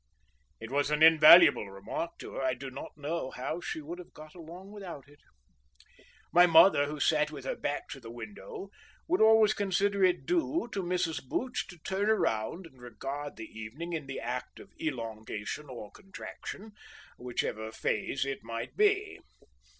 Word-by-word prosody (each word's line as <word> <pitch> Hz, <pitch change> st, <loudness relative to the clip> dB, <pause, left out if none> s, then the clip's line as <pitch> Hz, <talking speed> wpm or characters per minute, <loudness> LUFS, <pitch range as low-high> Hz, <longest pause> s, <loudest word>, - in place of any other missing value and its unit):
It 115 Hz, +2 st, -8 dB
was 145 Hz, +1 st, +1 dB
an 150 Hz, +1 st, +2 dB
invaluable 160 Hz, -, +8 dB
remark 100 Hz, +12 st, -5 dB
to -, -, -9 dB
her; -, -, -4 dB
I 130 Hz, -1 st, +1 dB
do 135 Hz, +1 st, -8 dB
not 135 Hz, +3 st, -9 dB
know 150 Hz, -1 st, -3 dB
how 135 Hz, +7 st, -4 dB
she 160 Hz, -, -4 dB
would 170 Hz, +4 st, -7 dB
have 180 Hz, -, -13 dB
got 155 Hz, 0 st, -12 dB
along 175 Hz, +3 st, -11 dB
without 180 Hz, -9 st, -9 dB
it. 145 Hz, 0 st, -20 dB, 1.1 s
My 175 Hz, +1 st, +8 dB
mother, 165 Hz, -3 st, +6 dB
who 150 Hz, 0 st, -5 dB
sat 150 Hz, 0 st, +2 dB
with 140 Hz, -4 st, -9 dB
her -, -, -2 dB
back 145 Hz, -, -3 dB
to -, -, -7 dB
the 115 Hz, -3 st, -11 dB
window, 115 Hz, -, -9 dB, 0.4 s
would 355 Hz, +2 st, +2 dB
always 220 Hz, -1 st, +6 dB
consider 200 Hz, 0 st, +1 dB
it 180 Hz, -1 st, +3 dB
due 335 Hz, -4 st, 0 dB
to 195 Hz, -, -2 dB
Mrs. 175 Hz, -2 st, -1 dB
Booch 250 Hz, -, -3 dB
to 180 Hz, -, -12 dB
turn 190 Hz, +5 st, -1 dB
about 165 Hz, -, 0 dB
and 130 Hz, -6 st, -16 dB
regard 135 Hz, +4 st, -6 dB
the 110 Hz, -, -7 dB
evening 115 Hz, +12 st, -7 dB
in 155 Hz, -4 st, -4 dB
the 135 Hz, -, -5 dB
act 125 Hz, +1 st, -5 dB
of -, -, -15 dB
elongation 115 Hz, -1 st, -4 dB
or 115 Hz, -5 st, -8 dB
contraction, 200 Hz, +1 st, -9 dB, 0.5 s
whichever 110 Hz, -3 st, -3 dB
phase 110 Hz, +4 st, -1 dB
it 135 Hz, 0 st, -3 dB
might 115 Hz, +1 st, -6 dB
be. 415 Hz, -1 st, +2 dB
150 Hz, 170 wpm, -30 LUFS, 125-185 Hz, 1.1 s, invaluable